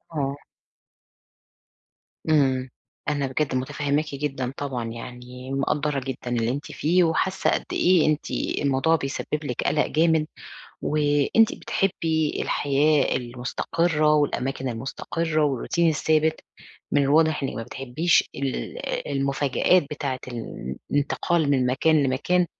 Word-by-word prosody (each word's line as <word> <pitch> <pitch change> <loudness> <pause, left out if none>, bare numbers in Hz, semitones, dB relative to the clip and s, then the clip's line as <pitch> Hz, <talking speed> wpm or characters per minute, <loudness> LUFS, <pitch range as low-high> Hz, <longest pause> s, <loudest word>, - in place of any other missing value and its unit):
آه. 140 -1 -1 1.9
إمم، 130 -4 +2 0.4
أنا 145 -2 0
بجَد 135 +1 -1
متفهماكِ 145 +3 -1
جدًا 135 -3 -3
طبعًا 130 -5 -3
يعني، 125 +2 -9
مِقَدّرة 140 +1 0
جدًا 130 -1 -5
اللي 120 -2 0
أنتِ 145 +2 -4
فيه، 175 +4 +2
وحاسة 185 +4 +1
قد - - 0
إيه 180 -3 +4
أنتِ 155 0 0 0.3
الموضوع 140 +3 +2
بيسبب 150 +1 -3
لِك 125 -5 -3
قلق 150 +1 +2
جامد، 160 -1 +2 0.6
و 150 - -1 0.4
أنتِ 225 -1 +5
بتحبي 160 -5 -1
الحياة 145 +1 +2
المستقرة، 150 +6 0
والأماكن 135 -3 0
المستقرة 155 +6 -2
والروتين 150 +5 +1
الثابت. 155 0 +1 0.5
من 145 - +4
الواضح 155 +2 +3
إنِك 135 - -2
ما 115 - -3
بتحبيش 135 +8 +1
ال 135 - -3 0.3
المفاجآت 140 +5 +2
بتاعة 140 -3 -3
ال 110 - -6
الانتقال 145 +2 +1
من 130 -3 +2
مكان 150 +4 +3
لمكان، 150 +7 +1
145 Hz, 115 wpm, -24 LUFS, 130-155 Hz, 1.9 s, أنتِ